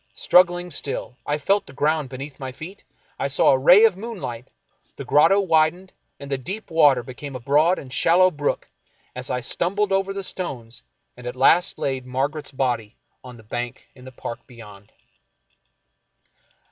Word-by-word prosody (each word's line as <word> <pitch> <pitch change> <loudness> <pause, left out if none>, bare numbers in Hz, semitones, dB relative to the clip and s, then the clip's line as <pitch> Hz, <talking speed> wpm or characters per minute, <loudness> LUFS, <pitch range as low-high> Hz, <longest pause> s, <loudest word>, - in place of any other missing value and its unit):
Strug 180 +1 +5
gling 175 -1 -6
still, 135 -3 -5
I 145 - 0
felt 195 +7 0
the 135 - -12
ground 150 0 0
beneath 135 +2 -8
my 130 -1 -5
feet, 165 +9 -11 0.4
I - - 0
saw 135 - +3
a 135 - +4
ray 180 +10 +7
of 215 -5 +3
moonlight 185 - -7 0.3
— - - -42
the - - -7
grotto 195 +7 +4
widened, 175 0 +1 0.3
and 140 0 -9
the 135 - -1
deep 190 - -7
water 145 -6 +4
became 130 +3 -9
a - - -5
broad 150 +8 +2
and 130 -2 -9
shallow 180 +5 +4
brook 145 -2 -2 0.5
as 125 0 -5
I 125 - -2
stumbled 195 - -1
over 195 0 +1
the 195 0 -5
stones 125 -12 -6 0.3
and 125 0 -10
at 125 - -5
last 165 +8 +3
laid 130 -2 -3
Margaret's 140 +4 -3
body 120 -5 -2 0.3
on 125 -1 -11
the 115 - -16
bank 120 +4 -6
in 125 - -16
the 130 - -11
park 120 -1 -8
beyond. 105 -5 -14
140 Hz, 175 wpm, -22 LUFS, 125-175 Hz, 0.5 s, ray